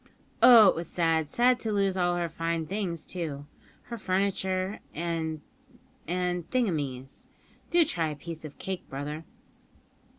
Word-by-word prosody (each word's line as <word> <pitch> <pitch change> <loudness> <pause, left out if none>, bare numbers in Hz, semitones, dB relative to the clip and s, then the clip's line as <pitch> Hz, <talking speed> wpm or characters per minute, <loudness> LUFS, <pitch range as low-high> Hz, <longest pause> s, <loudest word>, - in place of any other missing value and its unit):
Oh! 230 -4 +10
it - - +1
was 170 0 -4
sad; 165 -3 +1
sad 245 +4 +3
to 220 - -2
lose 195 -2 +1
all 175 -1 +1
her 175 -1 -1
fine 165 0 -2
things, 180 -3 -3
too 150 -6 -5 0.4
her 235 -1 -7
furniture, 190 0 0 0.2
and 160 -2 -2 0.7
and 180 0 -1
thingumies. 150 - -2 0.4
Do 345 -2 +5
try 165 - -1
a 150 - -5
piece 160 +2 -7
of 150 -2 -9
cake, 190 -1 -5
brother." 150 +4 -5
175 Hz, 140 wpm, -28 LUFS, 160-195 Hz, 0.7 s, Oh